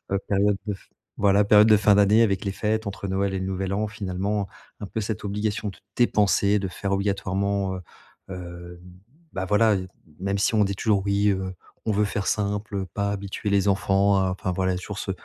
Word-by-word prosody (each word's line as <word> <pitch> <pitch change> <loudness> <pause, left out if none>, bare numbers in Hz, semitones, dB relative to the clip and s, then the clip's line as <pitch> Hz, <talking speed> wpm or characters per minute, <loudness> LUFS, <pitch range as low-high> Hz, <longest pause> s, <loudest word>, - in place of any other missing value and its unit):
heu, 100 - +2
période 100 0 +2
de 105 - -1
f 95 - -16 0.3
voilà, 100 0 +4
période 105 +1 +6
de 110 - +7
fin 105 0 +4
d'année 105 +2 +5
avec 100 -3 +1
les 100 - 0
fêtes 110 +2 -1
entre 100 0 -5
Noël 95 +1 -1
et - - -1
le 95 - -3
Nouvel 95 0 -2
An 105 +2 0
finalement, 100 0 -2 0.3
un 105 - -5
peu 110 - -4
cette 110 +1 -4
obligation 105 +1 -2
de 95 - -8 0.2
dépenser, 105 -3 +3
de 95 -1 -3
faire 100 +2 -4
obligatoirement, 100 0 -1
heu 90 - -6 0.5
heu, 90 -1 -8 0.5
bah 95 - -3
voilà, 105 +2 +3
heu, 95 - -4 0.3
même 100 +2 -1
si 100 - +1
on 105 - +4
dit 100 0 -1
toujours: 100 -3 +1
«Oui, 100 +1 +2
heu, 95 -1 -1 0.3
on 110 - 0
veut 105 +1 +2
faire 100 -1 -3
simple, 100 -1 -1
pas 100 -1 0
habituer 100 +1 -4
les 100 0 +2
enfants 100 0 +3
à». 95 -1 +1
Enfin 95 0 -3
voilà, 95 0 0
toujours 95 +2 -6
ce - - -4
100 Hz, 210 wpm, -25 LUFS, 95-105 Hz, 0.5 s, de